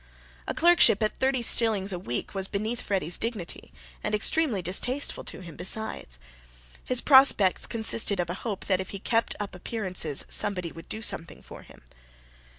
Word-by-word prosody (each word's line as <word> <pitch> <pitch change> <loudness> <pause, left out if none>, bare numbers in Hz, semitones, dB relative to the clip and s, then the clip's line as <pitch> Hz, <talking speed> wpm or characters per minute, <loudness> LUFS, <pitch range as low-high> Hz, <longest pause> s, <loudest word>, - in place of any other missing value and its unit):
A - - -3
clerkship 340 - +5
at 215 - -2
thirty 260 -2 0
shillings 215 -4 +3
a 180 - -4
week 120 -9 -5
was 195 -1 -3
beneath 215 +5 -3
Freddy's 185 -4 -1
dignity, 220 -7 -6 0.3
and 210 - -1
extremely 220 - 0
distasteful 245 - -3
to - - -7
him 170 -4 -11
besides. 190 - -1 0.7
His 250 -1 +3
prospects 265 -9 +5
consisted 220 -3 +1
of 175 - -1
a 185 - -7
hope 210 -5 -5
that 190 -2 0
if 190 - -8
he 200 - -6
kept 230 +3 -1
up 205 -1 -5
appearances 180 -6 0
somebody 180 -5 0
would 165 - -13
do 220 - -5
something 170 -5 -2
for - - -12
him. - - -18
205 Hz, 165 wpm, -26 LUFS, 180-230 Hz, 0.7 s, clerkship